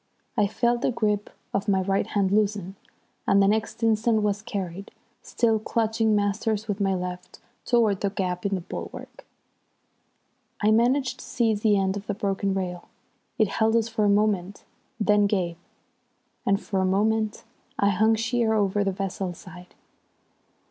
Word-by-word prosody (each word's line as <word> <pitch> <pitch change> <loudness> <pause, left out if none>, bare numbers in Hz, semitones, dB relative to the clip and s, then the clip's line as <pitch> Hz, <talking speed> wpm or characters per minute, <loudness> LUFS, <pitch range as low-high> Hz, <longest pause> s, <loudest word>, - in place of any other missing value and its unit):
I 205 - +3
felt 240 +3 0
the - - +2
grip 210 -4 -1 0.2
of 200 0 -1
my 190 -2 +3
right 195 +1 0
hand 195 -2 0
loosen, 200 -2 0 0.5
and 195 - +5
the 195 - +5
next 220 +2 -1
instant 220 0 +2
was 205 -1 0
carried, 200 -4 -5 0.3
still 225 -2 +1
clutching 220 0 +1
Masters 210 +1 0
with 205 -1 -2
my 195 -1 +2
left, 180 0 -6 0.3
towards 225 -5 +2
that 200 0 -2
gap 180 -2 -2
in 200 -1 0
the 185 - -3
bulwark. - - -8 1.3
I 210 +1 +3
managed 250 +3 +2
to - - -9
seize 220 -4 0
the 210 -2 +4
end 190 0 0
of 200 +1 -8
the 205 - -2
broken 195 -1 -1
rail. 180 -2 -4 0.5
It 220 -3 +3
held 220 +3 +1
us 230 0 +2
for 220 -1 -1
a 205 - +4
moment, 205 -2 +1 0.4
then 210 -1 +3
gave, 180 -5 -1 0.9
and 195 0 +3
for 195 -3 -2
a - - +1
moment 215 +3 +1 0.3
I 200 -7 +3
hung 220 +3 +3
sheer 225 0 +1
over 205 -1 +1
the 195 - 0
vessel's 190 -2 -4
side. 180 +2 -13
205 Hz, 160 wpm, -25 LUFS, 195-220 Hz, 1.3 s, and